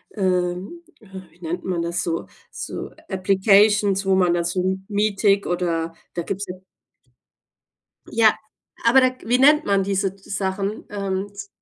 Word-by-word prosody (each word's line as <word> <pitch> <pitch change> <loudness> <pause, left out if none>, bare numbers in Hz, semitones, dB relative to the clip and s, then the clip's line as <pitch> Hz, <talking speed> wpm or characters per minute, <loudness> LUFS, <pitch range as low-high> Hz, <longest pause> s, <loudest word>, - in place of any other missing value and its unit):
ähm, 185 - -1 0.2
äh, 220 - -19 0.2
wie 170 - -26
nennt 175 +2 -4
man 180 -2 -2
das 170 +1 -2
so? 165 -1 -3 0.2
So, - - -6 0.2
applications 195 +1 +3
wo 190 -1 +3
man 180 -2 +3
da 170 0 0
so 185 +2 -1
Meetic 205 -1 +2
oder 165 -2 -1 0.2
da 170 - -1
gibt's 200 +3 -4
ja. 180 - -6 1.5
Ja, 225 -2 +4 0.5
aber 260 +3 +6
da 255 - +5
wie 245 +2 +2
nennt 300 +3 +5
man 200 -1 +2
diese 195 -1 0
d 195 0 -22
Sachen? 195 +1 -2
Ähm 200 -1 -3
z 200 0 -8
195 Hz, 150 wpm, -22 LUFS, 180-205 Hz, 1.5 s, aber